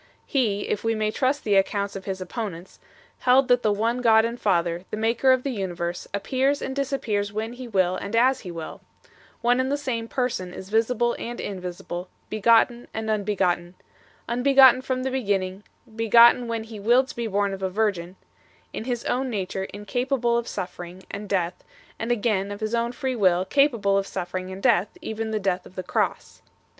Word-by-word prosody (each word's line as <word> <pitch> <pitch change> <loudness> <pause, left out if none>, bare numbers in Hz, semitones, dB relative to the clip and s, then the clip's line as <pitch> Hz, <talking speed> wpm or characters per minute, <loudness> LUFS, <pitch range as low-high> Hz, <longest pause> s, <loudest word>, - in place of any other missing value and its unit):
He, 220 -7 0
if 210 - -2
we 225 0 +1
may 215 0 0
trust 270 +5 0
the 210 - +1
accounts 200 +1 0
of 195 - -7
his 190 -1 -3
opponents, 185 -2 -6 0.4
held 255 +1 +4
that 245 0 +4
the 215 - +2
one 230 +4 0
God 220 -2 +5
and 235 +1 -4
Father, 175 -3 +1
the - - -4
Maker 230 +4 +3
of 255 -1 +3
the 275 - -1
universe, 175 -5 -4
appears 265 +7 0
and 265 - -4
disappears 240 -8 -1
when 220 +3 -4
He 250 0 -8
will 185 -4 +1
and 200 +4 -4
as 255 +3 +4
He 185 - -9
will; 165 -2 -7 0.6
one 245 +1 +3
and 260 +1 0
the 285 - +1
same 245 -5 -3
Person 230 -9 -2
is 190 - -9
visible 235 +2 +1
and 240 +1 -5
invisible, 180 -2 -6 0.2
begotten 230 +3 +3
and 220 0 -2
unbegotten; 185 -4 0 0.5
unbegotten 260 +1 +6
from 260 -1 -2
the 265 - -1
beginning, 195 -6 -1 0.3
begotten 235 +2 +6
when 230 -1 -2
He 220 -1 -9
willed 245 +6 +3
to - - -8
be 235 -1 -2
born 200 -1 0
of 195 - -7
a 190 - 0
virgin; 185 -3 -1 0.6
in 220 - -5
His 245 -2 -3
own 260 +1 0
nature 190 -3 -3
incapable 240 +4 -1
of 235 0 -1
suffering 180 0 -6
and 205 0 -6
death, 180 -3 -1 0.4
and 225 +2 -2
again 205 -4 0
of 205 - -6
His 215 +1 -3
own 235 0 0
free 260 +1 -3
will 185 -4 +3
capable 225 -6 +3
of 195 - -4
suffering 185 0 -4
and 190 +1 -8
death, 215 -6 +2
even 220 0 -4
the 215 -1 -1
death 190 -2 -1
of 185 - -18
the 185 - -4
cross. - - -2
220 Hz, 190 wpm, -25 LUFS, 190-245 Hz, 0.6 s, unbegotten